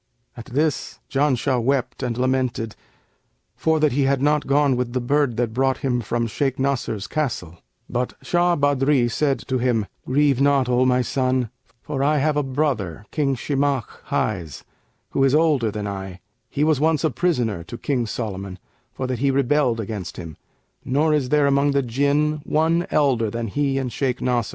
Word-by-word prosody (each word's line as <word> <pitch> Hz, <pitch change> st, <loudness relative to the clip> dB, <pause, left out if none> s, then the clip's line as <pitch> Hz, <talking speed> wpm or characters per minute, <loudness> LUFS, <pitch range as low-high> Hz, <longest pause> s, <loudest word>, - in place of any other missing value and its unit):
At 120 Hz, -, -10 dB
this 150 Hz, +4 st, -1 dB
Janshah 135 Hz, -2 st, +1 dB
wept 130 Hz, 0 st, 0 dB
and 120 Hz, -3 st, -2 dB
lamented 125 Hz, -4 st, -1 dB, 0.8 s
for 160 Hz, -1 st, +1 dB
that 150 Hz, -1 st, +3 dB
he 135 Hz, +2 st, +1 dB
had 135 Hz, 0 st, +2 dB
not 150 Hz, +2 st, +1 dB
gone 140 Hz, -1 st, +3 dB
with 125 Hz, -1 st, -2 dB
the 130 Hz, -, 0 dB
bird 135 Hz, -1 st, +1 dB
that 120 Hz, -2 st, -1 dB
brought 130 Hz, +2 st, +1 dB
him 125 Hz, -2 st, +1 dB
from 115 Hz, +2 st, -1 dB
Shaykh 135 Hz, +4 st, -1 dB
Nasr's 130 Hz, -6 st, -1 dB
castle; 100 Hz, -, -3 dB, 0.3 s
but 125 Hz, +1 st, -2 dB
Shah 175 Hz, 0 st, +2 dB
Badri 140 Hz, -3 st, +2 dB
said 140 Hz, +1 st, +1 dB
to 130 Hz, -2 st, 0 dB
him, 120 Hz, -4 st, +1 dB, 0.2 s
'Grieve 140 Hz, 0 st, +2 dB
not, 140 Hz, -2 st, +3 dB
O 125 Hz, +1 st, +3 dB
my 125 Hz, 0 st, +3 dB
son, 130 Hz, -2 st, 0 dB, 0.3 s
for 135 Hz, -2 st, -3 dB
I 150 Hz, +2 st, +3 dB
have 150 Hz, +1 st, +1 dB
a 150 Hz, -, +2 dB
brother, 130 Hz, -, -2 dB
King 140 Hz, -3 st, 0 dB
Shimαkh 140 Hz, -1 st, -1 dB
highs, 85 Hz, -, -2 dB, 0.5 s
who 135 Hz, -, +1 dB
is 135 Hz, +1 st, +4 dB
older 150 Hz, -8 st, +3 dB
than 105 Hz, 0 st, -4 dB
I; 95 Hz, -2 st, -6 dB, 0.3 s
he 145 Hz, -, -1 dB
was 155 Hz, -3 st, +3 dB
once 155 Hz, +1 st, +2 dB
a 160 Hz, -, +2 dB
prisoner 120 Hz, -, 0 dB
to 120 Hz, -, -8 dB
King 125 Hz, -4 st, -1 dB
Solomon, 100 Hz, -4 st, -5 dB, 0.3 s
for 130 Hz, -, -4 dB
that 130 Hz, -2 st, -2 dB
he 140 Hz, +2 st, +2 dB
rebelled 135 Hz, -2 st, +2 dB
against 105 Hz, -4 st, -5 dB
him; 80 Hz, -3 st, -7 dB, 0.5 s
nor 150 Hz, +4 st, +2 dB
is 140 Hz, -4 st, 0 dB
there 150 Hz, 0 st, +3 dB
among 140 Hz, 0 st, +3 dB
the 140 Hz, -1 st, +2 dB
Jinn 145 Hz, +5 st, +1 dB
one 165 Hz, +3 st, +1 dB
elder 130 Hz, -7 st, +2 dB
than 115 Hz, +1 st, -4 dB
he 140 Hz, +3 st, 0 dB
and 130 Hz, -3 st, -2 dB
Shaykh 130 Hz, -2 st, -1 dB
Nasr. 120 Hz, -3 st, 0 dB
130 Hz, 180 wpm, -22 LUFS, 120-145 Hz, 0.8 s, is